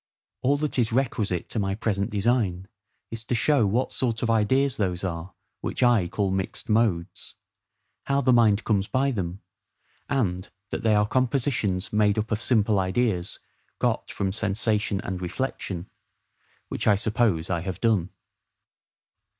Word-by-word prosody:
All 140 +3 +2
that 150 -2 -1
is 115 -2 +1
requisite 110 -8 0
to 115 - -2
my 95 -1 0
present 100 -2 -1
design, 100 -4 0 0.4
is 115 0 -5
to 120 - 0
show 120 -2 +3
what 120 +7 0
sort 115 -3 -1
of 115 - +2
ideas 130 +5 +2
those 90 -4 -1
are 90 0 -4 0.2
which - - -2
I 120 -7 +4
call 100 +2 -1
mixed 95 +3 -3
modes; 105 -6 0 0.7
how 140 0 +1
the 130 -1 +4
mind 110 -3 +4
comes 100 -3 +1
by 135 +1 +1
them; 95 -5 -4 0.7
and 95 -10 -1 0.2
that - - -3
they 110 -2 +3
are 105 0 +4
compositions 115 -7 0
made 105 -1 +3
up 110 +1 -2
of 110 0 0
simple 110 -5 +2
ideas 95 -1 0 0.4
got - - 0
from 95 -1 -2
sensation 105 0 0
and 95 -1 -4
reflection; 95 -3 -4 0.8
which - - -3
I 105 - +6
suppose 105 -5 0
I 85 -2 0
have 95 +1 -5
done. 105 -7 +2
105 Hz, 150 wpm, -25 LUFS, 95-120 Hz, 0.8 s, I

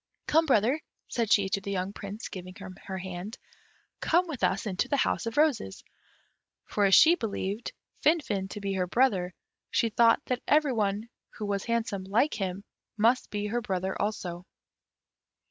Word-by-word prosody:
"Come, 320 +1 +3
brother," 255 +4 +3 0.3
said 230 -4 -1
she 200 -2 +5
to 195 - -1
the 200 - -6
young 190 0 -2
Prince, 205 +2 -7
giving 185 0 -8
him 190 -3 -9
her 190 -1 -4
hand, 185 +3 -6 0.6
"come 350 +3 +3
with 285 -7 -6
us 195 - +1
into 190 -4 -1
the 285 - +1
House 240 - 0
of 230 - -4
Roses." 290 - +1 0.8
For 205 - +1
as 195 - +6
she 330 - +8
believed 220 - -3 0.3
Finfin 220 - +1
to 210 - -6
be 200 -1 -2
her 185 -1 0
brother, 185 -5 +1 0.3
she 230 - +1
thought 230 +1 +4
that 250 -1 -2
every 295 -2 +4
one 210 0 0 0.3
who 215 - -4
was 200 -1 -2
handsome, 225 -5 -1
like 230 +10 +2
him, 195 -1 -3 0.3
must 230 +4 +3
be 205 0 -3
her 235 +4 -1
brother 190 -4 -2
also. 185 -3 -3
205 Hz, 170 wpm, -28 LUFS, 190-240 Hz, 0.8 s, she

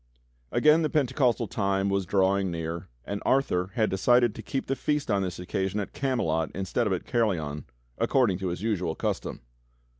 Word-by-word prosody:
the 155 +1 +4
Pentecostal 130 -5 +2
time 100 -1 0
was 100 -2 0
drawing 95 0 +2
near, 85 0 -4 0.2
and 100 0 -4
Arthur 130 -10 +2
/"X - - -20
had 110 -2 +2
decided 120 +4 +3
to - - -8
keep 135 - -3
the 135 - -1
Feast 150 -3 -1
on 100 -1 +2
this 90 -2 -3
occasion 95 +3 -2
at 100 - -5
Camelot 80 - 0
^ - - -17
instead 95 +5 -1
of 100 - +1
at 90 - -3
Caerleon, 85 - -1 0.3
according 115 -9 +2
to 95 - -2
his 90 +2 -4
usual 90 -7 -1
custom. - - -3
100 Hz, 180 wpm, -27 LUFS, 90-125 Hz, 0.3 s, the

